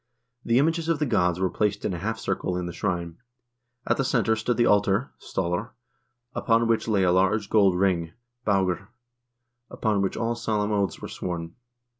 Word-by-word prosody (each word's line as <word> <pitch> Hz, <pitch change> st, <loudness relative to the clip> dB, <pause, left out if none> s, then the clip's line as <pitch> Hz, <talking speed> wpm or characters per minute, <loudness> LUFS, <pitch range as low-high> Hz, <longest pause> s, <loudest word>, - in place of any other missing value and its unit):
The 115 Hz, +1 st, +2 dB
images 165 Hz, +3 st, +1 dB
of 165 Hz, -, +2 dB
the 150 Hz, -, 0 dB
gods 90 Hz, -, +1 dB
were 95 Hz, -1 st, +1 dB
placed 105 Hz, -1 st, -1 dB
in 95 Hz, -, 0 dB
a 85 Hz, -, -4 dB
half 110 Hz, +4 st, -2 dB
circle 95 Hz, -3 st, -2 dB
in 90 Hz, -, -3 dB
the 85 Hz, -, -5 dB
shrine. 85 Hz, -3 st, -3 dB, 0.7 s
At -, -, +1 dB
the 135 Hz, -, +1 dB
center 115 Hz, -4 st, +2 dB
stood 110 Hz, +2 st, -1 dB
the 120 Hz, -, +4 dB
altar 105 Hz, +4 st, +2 dB
{stallr), 95 Hz, +6 st, -2 dB, 0.6 s
upon 115 Hz, 0 st, +2 dB
which 115 Hz, 0 st, +1 dB
lay 100 Hz, -4 st, +2 dB
a 90 Hz, -, +4 dB
large 95 Hz, +3 st, +2 dB
gold 100 Hz, -4 st, +4 dB
ring 90 Hz, -3 st, +1 dB, 0.3 s
(baugr), 95 Hz, -3 st, +1 dB, 0.8 s
upon 105 Hz, -3 st, 0 dB
which 95 Hz, -, -1 dB
all 115 Hz, 0 st, 0 dB
solemn 110 Hz, -3 st, -1 dB
oaths 100 Hz, -2 st, -1 dB
were -, -, -4 dB
sworn. 85 Hz, -2 st, -5 dB
100 Hz, 180 wpm, -25 LUFS, 90-115 Hz, 0.8 s, the